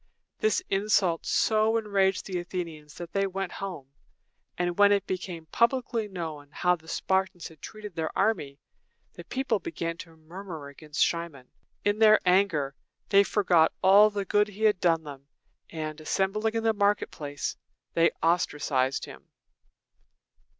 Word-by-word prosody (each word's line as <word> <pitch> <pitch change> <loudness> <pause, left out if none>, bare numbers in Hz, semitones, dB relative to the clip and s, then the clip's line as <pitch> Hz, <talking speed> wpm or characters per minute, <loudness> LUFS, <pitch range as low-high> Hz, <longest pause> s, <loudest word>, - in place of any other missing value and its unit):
This 435 -3 +1
insult 195 -4 +1
so 220 +1 +2
enraged 195 -3 +1
the 185 -2 -3
Athenians 165 -4 -6
that 175 -1 -8
they 195 0 +1
went 195 -1 -4
home; 175 -9 -7 0.7
and 175 +1 -2
when 205 0 +7
it 200 -1 +2
became 180 -3 -5
publicly 235 - +1
known 160 -7 -6
how 180 +4 +1
the 160 -1 -19
Spartans 190 0 -1
had 160 -3 -18
treated 210 -2 -9
their 160 -1 -2
army, 190 -10 0 0.6
the - - -10
people 260 -5 -1
began 165 -1 -4
to 165 -1 -11
murmur 165 -2 -9
against 150 +1 0
Cimon. 170 -7 -5 0.4
In 205 +1 +1
their 215 -1 +7
anger, 180 -7 +2 0.4
they 200 0 +6
forgot 180 -6 +3
all 200 +3 +7
the 205 -1 -3
good 210 +2 +2
he 210 +1 -8
had 210 -4 +4
done 165 -2 +2
them, 140 -2 -10 0.4
and, 155 -1 -5
assembling 210 +7 0
in 225 - 0
the 225 -1 +3
market 205 0 +1
place, 145 -1 -5 0.4
they 165 0 +4
ostracized 145 -6 +1
him. - - -13
180 Hz, 150 wpm, -27 LUFS, 160-205 Hz, 0.7 s, when